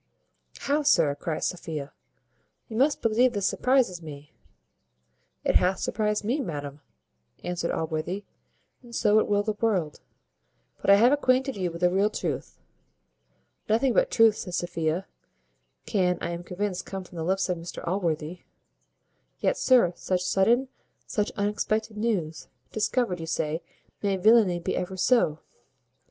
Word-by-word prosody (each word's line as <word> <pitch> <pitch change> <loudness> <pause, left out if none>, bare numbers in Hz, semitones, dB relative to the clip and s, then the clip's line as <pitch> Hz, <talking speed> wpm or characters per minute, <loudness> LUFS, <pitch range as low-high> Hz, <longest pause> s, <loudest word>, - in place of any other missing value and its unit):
"How, 290 +2 +1
sir!" 165 - +4
cries 155 +2 -3
Sophia 155 -5 -4 0.7
"you 225 - -8
must 280 +5 +2
believe 235 +2 +3
this 200 -2 -1
surprizes 250 -9 +1
me." 150 -2 -10 1.1
"It - - +4
hath 185 +1 +1
surprized 210 0 -1
me, 250 +8 0
madam," 145 - -6 0.6
answered 175 -1 -2
Allworthy, 160 +5 -2 0.6
"and 240 -2 -11
so 210 +1 +4
it - - 0
will 205 0 +2
the 215 0 -1
world. 185 -10 0 0.8
But - - -1
I 200 - +9
have 235 +5 +5
acquainted 265 -1 +2
you 185 -3 -1
with 170 +1 -9
the 180 0 +4
real 195 +3 +2
truth." - - -4 1.1
"Nothing 235 +4 +3
but - - +3
truth," 225 - +4
says 180 -2 -4
Sophia, 170 +1 -2 0.8
"can, 180 -4 +1
I 170 - -3
am 170 0 -5
convinced, 185 +1 -4
come 195 -1 -5
from 180 -1 -13
the 165 - -3
lips 190 +3 0
of 180 -2 -2
Mr 170 0 -8
Allworthy. 170 -2 -2 1.0
Yet, - - +1
sir, 245 - +4
such 180 0 -1
sudden, 230 +8 +2 0.4
such 210 -1 -1
unexpected 215 +1 -1
news. 185 - -2 0.2
Discovered, 215 -3 0
you 165 - -6
say 160 0 -1 0.4
may 200 -2 0
villany 210 -2 +5
be 170 - -2
ever 185 +1 -3
so!" 180 -7 +2
190 Hz, 145 wpm, -26 LUFS, 170-225 Hz, 1.1 s, I